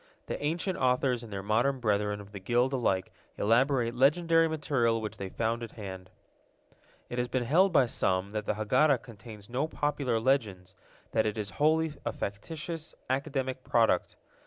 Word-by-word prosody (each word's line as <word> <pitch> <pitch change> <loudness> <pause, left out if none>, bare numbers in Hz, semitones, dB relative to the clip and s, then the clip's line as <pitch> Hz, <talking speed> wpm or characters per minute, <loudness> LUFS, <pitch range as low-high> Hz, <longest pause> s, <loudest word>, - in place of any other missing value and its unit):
The - - -5
ancient 170 +5 -1
authors 125 -1 +2
and 115 -3 -10
their 95 -1 -4
modern 120 +6 +1
brethren 105 -3 0
of 100 0 -12
the 100 - -7
guild 120 +7 +1
alike 95 -8 0 0.2
elaborate 120 +2 +2
legendary 165 +5 +4
material 135 -7 +1
which 110 -1 -5
they 95 - -5
found 115 +3 -1
at 115 - -7
hand. 95 -4 -8 1.0
It 120 - -4
has 125 - 0
been 125 0 -1
held 175 +10 +4
by 135 - +5
some 95 -4 0
that 105 0 -4
the - - +1
Haggadah 125 +5 +3
contains 105 -3 -11
no 130 +6 -1
popular 145 -6 -1
legends, 105 -8 0 0.4
that 110 -1 +2
it 105 - -2
is 105 -2 -3
wholly 155 +5 +2
a - - -1
factitious, 160 - -6 0.2
academic 130 -2 -2
product. 115 -2 +2
120 Hz, 165 wpm, -29 LUFS, 105-140 Hz, 1.0 s, by